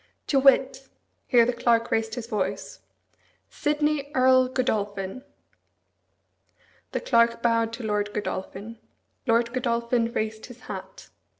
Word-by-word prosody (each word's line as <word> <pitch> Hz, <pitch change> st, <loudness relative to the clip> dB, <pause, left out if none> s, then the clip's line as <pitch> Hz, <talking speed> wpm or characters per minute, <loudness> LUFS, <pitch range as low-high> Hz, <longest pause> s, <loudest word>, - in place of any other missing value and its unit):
"To 275 Hz, -, +2 dB
wit 270 Hz, 0 st, +3 dB, 0.2 s
" -, -, -47 dB
Here 240 Hz, -3 st, +5 dB
the 245 Hz, -, 0 dB
Clerk 235 Hz, -1 st, +1 dB
raised 225 Hz, 0 st, 0 dB
his 245 Hz, -3 st, -5 dB
voice. 195 Hz, -3 st, -3 dB, 0.7 s
"Sidney 295 Hz, -1 st, 0 dB
Earl 255 Hz, 0 st, +5 dB
Godolphin." 210 Hz, -3 st, -2 dB, 1.7 s
The -, -, -2 dB
Clerk 235 Hz, -1 st, +2 dB
bowed 230 Hz, -1 st, +2 dB
to 235 Hz, +1 st, -6 dB
Lord 210 Hz, -1 st, -1 dB
Godolphin. 210 Hz, +2 st, -5 dB, 0.5 s
Lord 235 Hz, +1 st, +2 dB
Godolphin 235 Hz, -1 st, 0 dB
raised 220 Hz, -1 st, -3 dB
his 245 Hz, -1 st, -13 dB
hat. -, -, -9 dB
235 Hz, 120 wpm, -25 LUFS, 220-255 Hz, 1.7 s, Here